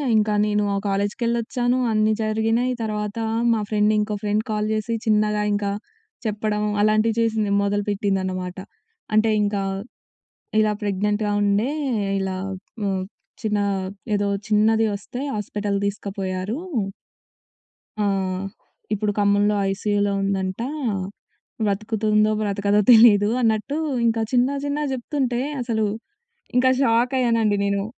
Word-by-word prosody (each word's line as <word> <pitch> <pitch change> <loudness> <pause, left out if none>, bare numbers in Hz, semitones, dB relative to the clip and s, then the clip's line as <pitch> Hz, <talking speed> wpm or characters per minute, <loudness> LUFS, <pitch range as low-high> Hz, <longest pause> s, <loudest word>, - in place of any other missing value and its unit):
ఇంకా 210 0 +2
నేనూ 210 0 +1
ఆ - - 0
కాలేజ్‌కెళ్ళొచ్చాను, 235 +4 0
అన్నీ 215 0 +3
జరిగినయి. 225 +3 +1
తర్వాత 210 0 -3 0.4
మా 220 - 0
ఫ్రెండ్ 210 0 +3
ఇంకో 210 0 -1
ఫ్రెండ్ 210 +1 +1
కాల్ 210 0 0
జేసి 220 +2 -1
చిన్నగా 210 -1 +2
ఇంకా 205 -1 -1 0.5
చెప్పడం 210 0 -1 0.2
అలాంటివి 215 +1 +3
చేసింది. 220 -3 +1
మొదలుపెట్టిందనమాట. 195 -3 -1 0.6
అంటే 215 +1 +4
ఇంకా 205 -1 0 1.0
"ఇలా 215 -1 +3
ప్రెగ్నెంట్‌గా 205 +1 0
ఉండే, 205 +5 +2 0.5
ఇలా 190 -1 -2 0.5
హ్మ్, 190 -2 0 0.4
చిన్నా 210 -2 0 0.5
ఏదో 205 0 0 0.2
చిన్నది 220 +1 +3
వస్తే 230 +5 -8 0.2
ఆస్పిటల్ 205 0 -2
దీసుకపోయారూ." 195 +1 -3 1.5
ఆ! - - +2 0.9
"ఇప్పుడు 210 0 0
ఖమ్మంలో 205 +1 +3
ఐసీయూలో 205 +1 0
ఉందంట. 190 -1 -1 1.1
బ్రతుకుతుందో, 215 +1 +1
బ్రతకదో 205 0 +1
తెలీదు" 220 -3 +7
అన్నట్టు 225 +5 +1 0.3
ఇంకా 225 0 +2
చిన్న 250 +1 +4 0.2
చిన్నగ 290 +1 -1
జెప్తుంటే 250 -1 -1 0.2
అసలూ 220 -3 0 0.7
ఇంకా 260 +1 +5
షాకయ్యానండి 230 -3 +2
నేను. 200 0 0
210 Hz, 105 wpm, -23 LUFS, 205-225 Hz, 1.5 s, తెలీదు